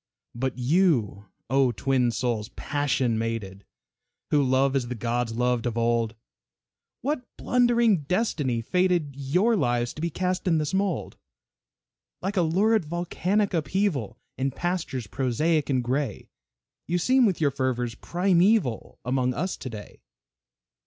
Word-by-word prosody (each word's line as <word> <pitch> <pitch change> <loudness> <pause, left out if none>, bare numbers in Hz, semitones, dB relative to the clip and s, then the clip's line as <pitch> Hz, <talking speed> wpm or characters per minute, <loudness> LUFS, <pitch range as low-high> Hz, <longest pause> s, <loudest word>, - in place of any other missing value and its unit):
But 130 +1 -3
you, 125 - +1 0.2
O 130 0 +3
twin 125 +1 +1
souls, 115 -3 -2
passion 135 -5 0
mated, 105 -4 -4 0.7
Who 150 - +4
love 135 +1 +2
as 130 -3 0
the 125 - -4
gods 120 0 -2
loved 125 0 +1
of 120 -1 -3
old, 115 -1 +1 0.9
What 290 +1 -1 0.2
blundering 235 - +3
destiny 150 - 0
fated 175 +1 +1
Your 180 - +2
lives 120 - 0
to 155 - -8
be 170 - 0
cast 185 +3 -2
in 165 -2 +3
this 155 +3 -1
mold? 195 -2 -1 1.0
Like 195 +3 -3
a 185 - +3
lurid 195 +6 +2
volcanic 180 +5 -1
upheaval, 155 - -1 0.2
In 135 +1 +1
pastures 165 -4 -3
prosaic 145 +8 0
and 130 -3 +1
gray, 130 -1 -2 0.6
You 175 - +1
seem 255 +7 +4
with 190 - -1
your 145 -3 +2
fervors 125 -3 -1
primeval, 180 - +1
Among 125 0 0
us 185 +1 -2
to 130 - -6
day. 105 -3 -10
140 Hz, 135 wpm, -26 LUFS, 120-180 Hz, 1.0 s, Who